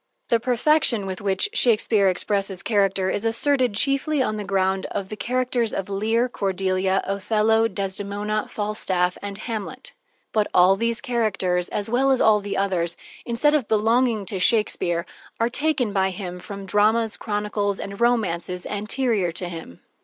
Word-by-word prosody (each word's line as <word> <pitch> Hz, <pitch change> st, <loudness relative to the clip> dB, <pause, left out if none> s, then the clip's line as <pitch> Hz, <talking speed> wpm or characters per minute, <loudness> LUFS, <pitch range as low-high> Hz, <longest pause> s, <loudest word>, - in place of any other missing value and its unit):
The 235 Hz, -, +3 dB
perfection 245 Hz, -2 st, +2 dB
with 190 Hz, -1 st, -5 dB
which 195 Hz, -, +1 dB
Shakespeare 220 Hz, -, +3 dB
expresses 195 Hz, 0 st, -2 dB
character 195 Hz, -3 st, +1 dB
is 205 Hz, -, -2 dB
asserted 245 Hz, 0 st, +2 dB
chiefly 275 Hz, +5 st, +2 dB
on 215 Hz, -5 st, 0 dB
the 210 Hz, -, -4 dB
ground 190 Hz, -1 st, 0 dB
of 190 Hz, -1 st, -5 dB
the 215 Hz, -, -5 dB
characters 245 Hz, 0 st, -1 dB
of 195 Hz, +1 st, -4 dB
Lear, 225 Hz, +5 st, +1 dB
Cordelia, 190 Hz, -3 st, 0 dB
Othello, 215 Hz, +3 st, +1 dB
Desdemona, 205 Hz, +1 st, -3 dB
Falstaff, 190 Hz, -4 st, -1 dB
and 200 Hz, -1 st, -5 dB
Hamlet. 225 Hz, -, -6 dB, 0.4 s
But 215 Hz, -1 st, +1 dB
all 180 Hz, +2 st, +6 dB
these 230 Hz, +3 st, -1 dB
characters, 195 Hz, -8 st, 0 dB
as 205 Hz, -, -2 dB
well 250 Hz, +4 st, +2 dB
as 265 Hz, -2 st, +3 dB
all 215 Hz, -1 st, +5 dB
the 205 Hz, 0 st, -4 dB
others, 175 Hz, -4 st, 0 dB, 0.3 s
instead 245 Hz, +6 st, +2 dB
of 285 Hz, -8 st, +1 dB
belonging 225 Hz, 0 st, +2 dB
to 190 Hz, 0 st, -3 dB
Shakespeare, 180 Hz, -4 st, +1 dB, 0.3 s
are 230 Hz, +1 st, +2 dB
taken 270 Hz, -5 st, 0 dB
by 190 Hz, -1 st, +2 dB
him 180 Hz, -1 st, -6 dB
from 200 Hz, +1 st, -8 dB
dramas, 215 Hz, +3 st, +2 dB
chronicles, 205 Hz, -1 st, -2 dB
and 200 Hz, +2 st, -7 dB
romances 180 Hz, -7 st, 0 dB
anterior 210 Hz, -2 st, -1 dB
to 180 Hz, +1 st, -3 dB
him. 165 Hz, -, -9 dB
210 Hz, 155 wpm, -23 LUFS, 195-230 Hz, 0.4 s, all